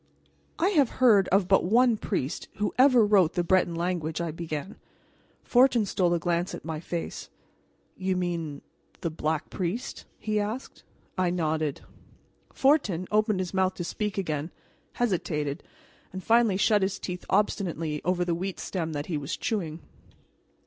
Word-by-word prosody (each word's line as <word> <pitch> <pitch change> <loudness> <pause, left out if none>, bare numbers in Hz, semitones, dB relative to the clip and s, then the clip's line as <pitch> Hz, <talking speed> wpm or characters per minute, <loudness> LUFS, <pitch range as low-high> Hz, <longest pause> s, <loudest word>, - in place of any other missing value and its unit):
"I 360 - +2
have 290 - +3
heard 220 -7 +5
of 195 -1 +2
but 195 0 +4
one 235 +5 +4
priest 140 -8 -3
who 210 -1 -1
ever 255 -4 +6
wrote 195 -6 +4
the 175 - 0
Breton 175 -1 +2
language," 170 -2 -2
I 170 -2 -2
began. 165 +3 -5 0.7
Fortin 245 -3 +4
stole 180 -3 +1
a - - 0
glance 175 +1 -1
at - - -11
my 160 -2 -4
face. 170 +1 -5 0.7
"You 185 -1 -1
mean 170 -5 -3 0.4
the 170 - -2
Black 155 -1 -2
Priest?" 190 +6 -4
he 215 -1 -1
asked. 215 +5 -4 0.4
I 180 -1 +2
nodded. 155 -4 -1 0.7
Fortin 240 - +2
opened 215 -2 +2
his 180 0 -5
mouth 190 0 +1
to 175 - -4
speak 210 +3 -3
again, 155 -5 -2 0.4
hesitated, 155 -10 -1 0.5
and 190 0 -7
finally 230 -4 +4
shut 210 +1 +3
his 190 +1 0
teeth 180 -1 -6
obstinately 170 -6 0
over 180 0 +1
the 175 - 0
wheat 180 0 -4
stem 165 -4 -3
that 145 0 -3
he 165 - -2
was 145 +3 -4
chewing. 170 -7 -3
185 Hz, 155 wpm, -27 LUFS, 165-210 Hz, 0.7 s, ever